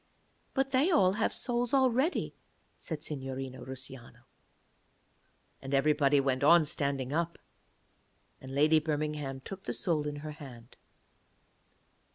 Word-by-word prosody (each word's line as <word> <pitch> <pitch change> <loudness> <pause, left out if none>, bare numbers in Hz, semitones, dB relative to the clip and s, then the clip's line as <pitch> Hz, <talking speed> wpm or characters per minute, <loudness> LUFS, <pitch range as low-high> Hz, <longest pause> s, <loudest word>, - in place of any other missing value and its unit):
'But 270 0 +1
they 270 +6 +3
all 280 - +4
have 215 +3 0
souls 245 +1 -1
already,' 265 +5 +2 0.5
said 155 -2 -5
Signorina 135 -3 -5
Russiano. 130 -1 -8 1.4
And 135 +1 -2
everybody 145 0 +3
went 135 -1 0
on 165 +2 +7
standing 140 -2 -2
up. 170 +1 -1 1.0
And 130 0 -8
Lady 155 +2 +5
Birmingham 150 -3 -3
took 195 +7 -9
the - - -2
soul 155 -5 0
in 145 - -4
her 155 - -4
hand. 125 -6 -12
150 Hz, 120 wpm, -31 LUFS, 135-185 Hz, 1.4 s, on